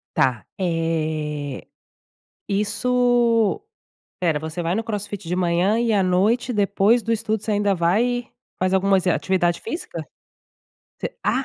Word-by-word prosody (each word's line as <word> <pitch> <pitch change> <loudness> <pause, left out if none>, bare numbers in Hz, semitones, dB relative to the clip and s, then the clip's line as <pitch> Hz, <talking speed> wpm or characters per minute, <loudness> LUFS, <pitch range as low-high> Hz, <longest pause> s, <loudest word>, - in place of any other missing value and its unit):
Tá. 130 -5 +1
Eh, 155 -5 -2 0.8
isso 235 - +2 0.6
Espera, 165 -4 +1
você 160 +2 -4
vai 170 +2 0
no 225 - 0
CrossFit 205 -5 -5
de 180 - -1
manhã 180 +4 +2
e 235 -1 +1
à 200 -2 +3
noite, 215 +7 +2
depois 205 +3 +3
do 230 - 0
estudo 220 -1 -1
você 215 0 -2
ainda 205 -1 +2
vai 230 +8 +1 0.3
faz 185 +1 +1
algumas 190 -1 +2
eh - - +4
atividade 175 -2 +1
física? 320 +10 -5 1.0
Você - - -5
Ah! 265 - +1
195 Hz, 135 wpm, -22 LUFS, 170-225 Hz, 1.0 s, eh